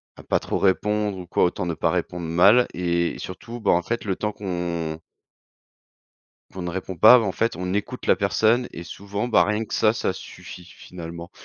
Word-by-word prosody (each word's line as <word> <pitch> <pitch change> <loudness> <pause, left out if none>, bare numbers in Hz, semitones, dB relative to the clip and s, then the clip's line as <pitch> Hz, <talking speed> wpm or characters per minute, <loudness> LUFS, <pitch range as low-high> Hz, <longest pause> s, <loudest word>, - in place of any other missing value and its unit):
à - - -13
pas - - +1
trop - - -3
répondre 105 +1 +1
ou 90 - -9
quoi - - +1
autant 90 +2 0
ne 85 - -2
pas 80 - 0
répondre 90 0 -3
mal 100 +9 +5
et 85 -1 -1
surtout, 115 +6 -8
ben, 110 - +2
en 85 - +3
fait 120 +3 -3
le 95 - -1
temps 105 +2 -2
qu'on 85 -5 -4 1.5
qu'on 95 - -6
ne 90 - -3
répond 95 +1 -5
pas, 125 +9 +8
bah, 115 - 0
en 95 - -1
fait 115 -4 -1
on 90 0 -3
écoute 105 - -4
la - - +4
personne 120 +3 +2
et 85 - -8
souvent, 100 +5 -5
ben, 120 - +5
rien 105 +2 -1
que - - -6
ça 110 - +3
ça 110 -4 -1
suffit 90 -1 -11
finalement. 85 -1 -10
95 Hz, 205 wpm, -23 LUFS, 85-105 Hz, 1.5 s, pas